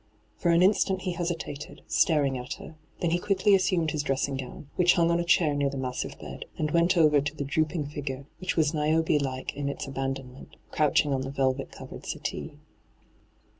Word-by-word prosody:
For 175 - 0
an 170 +1 +5
instant 190 -1 +3
he 185 - -1
hesitated, 170 -4 -4
staring 145 -5 +2
at 125 +3 -4
her. - - -10 0.3
Then 170 - +1
he 175 - +2
quickly 195 +2 +2
assumed 180 -4 +2
his 150 - -1
dress 135 -2 0
ing 135 -1 -3
gown, 135 +2 -8
which 175 -1 +5
hung 170 -1 +3
on 170 - +2
a - - +1
chair 170 -3 +3
near 145 -1 +1
the 135 - -5
massi've 130 -1 -3
bed, - - -8
and 150 -1 -1
went 170 +3 +3
over 150 -3 +5
to 150 +2 -3
the 145 - -3
droop 155 +4 0
ing 150 -4 -1
figure, 140 -2 -5
which 185 - -2
was 155 -1 +3
Niobe 155 0 +2
like 130 -2 -3
in 140 0 -3
its 140 - -4
abandonment, 135 -1 -5 0.2
crouching 150 -1 +2
on 135 - 0
the 135 - -4
velvet 135 0 0
coTered - - -10
settee. - - -4
150 Hz, 205 wpm, -27 LUFS, 135-170 Hz, 0.3 s, an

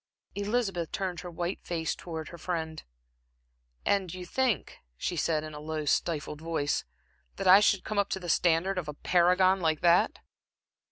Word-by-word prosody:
Elizabeth 200 -5 -1
turned 185 -3 -3
her 180 - -7
white 175 +2 -3
face 165 -2 -2
towards 160 -3 -7
her 170 - -9
friend. 160 -2 -3 1.0
"And 195 -4 +1
you 180 0 -7
think," 255 +3 -1 0.2
she 175 - -2
said, 155 -1 0
in 155 0 -7
a 150 - -7
low, 155 0 -4
stifled 150 0 -1
voice, 160 -3 -1 0.5
"that 195 - -4
I 190 +2 +10
should 205 -2 +3
come 215 -1 -2
up 200 - +1
to 190 - -2
the 180 - -8
standard 175 +3 +2
of 165 - -6
a 150 - -5
paragon 180 +3 +3
like 160 -2 +1
that?" 175 0 +4
175 Hz, 170 wpm, -29 LUFS, 160-190 Hz, 1.0 s, I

